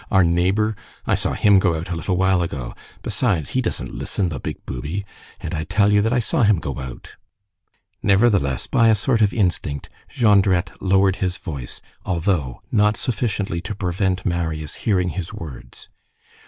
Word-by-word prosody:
Our 95 -2 +5
neighbor? 95 +6 +2 0.3
I - - +1
saw - - 0
him 100 -2 +5
go 90 -3 +2
out 80 +3 -5
a - - -1
little 90 +3 -1
while 95 -1 +3
ago. 65 -8 -4 0.3
Besides, 100 - 0
he 130 - 0
doesn't 115 - -3
listen, 95 -4 -2
the 70 -5 -5
big - - -6
booby. 75 +11 -4 0.3
And - - -5
I 80 - -2
tell 100 +3 +2
you 105 - +5
that 110 +2 +1
I 125 - +2
saw 130 +6 0
him 105 -3 +5
go 70 -5 -4
out." 65 -2 -9 0.8
Nevertheless, 100 - +3
by 115 - +3
a 110 - +5
sort 115 +2 +1
of 105 -2 +4
instinct, 85 - -1 0.2
Jondrette 100 -5 +3
lowered 95 0 +3
his 90 -1 -1
voice, 70 -8 -7 0.2
although 85 -7 -1
not 105 0 +3
sufficiently 105 -7 -2
to 95 +3 -5
prevent 95 -1 -1
Marius 80 -4 -2
hearing 90 -5 0
his 90 -2 -5
words. 65 -5 -10
95 Hz, 170 wpm, -22 LUFS, 85-105 Hz, 0.8 s, Our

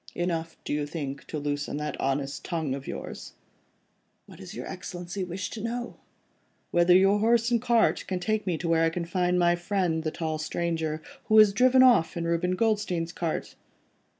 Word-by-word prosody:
"Enough, 165 -2 -2
do - - -2
you 145 0 -1
think, 145 -2 -6
to 155 - -4
loosen 145 0 -3
that 150 -1 -3
honest 135 +1 -2
tongue 160 -6 -2
of 135 0 -6
yours?" - - -7 0.9
"What - - -15
does - - -9
your - - -6
Excellency 180 +2 -6
wish 180 0 -5
to 220 - -6
know?" 240 +2 -4 0.7
"Whether 175 +1 +5
your 195 +2 +5
horse 230 +2 +3
and 235 -2 +2
cart 235 -2 +2
can 185 -1 -2
take 215 +2 -1
me 175 -3 0
to 170 - -4
where 165 0 +3
I 165 - +4
can 170 +1 -4
find 180 +1 0
my 175 -1 +4
friend 175 -3 -1
the 160 - 0
tall 155 -1 -3
stranger, 160 -1 -2 0.2
who 220 - +3
has 215 -2 +7
driven 255 +4 +5
off 215 -11 +4
in 170 - -2
Reuben 170 +2 0
Goldstein's 205 -6 0
cart?" 165 -2 -3
175 Hz, 185 wpm, -27 LUFS, 160-205 Hz, 0.9 s, has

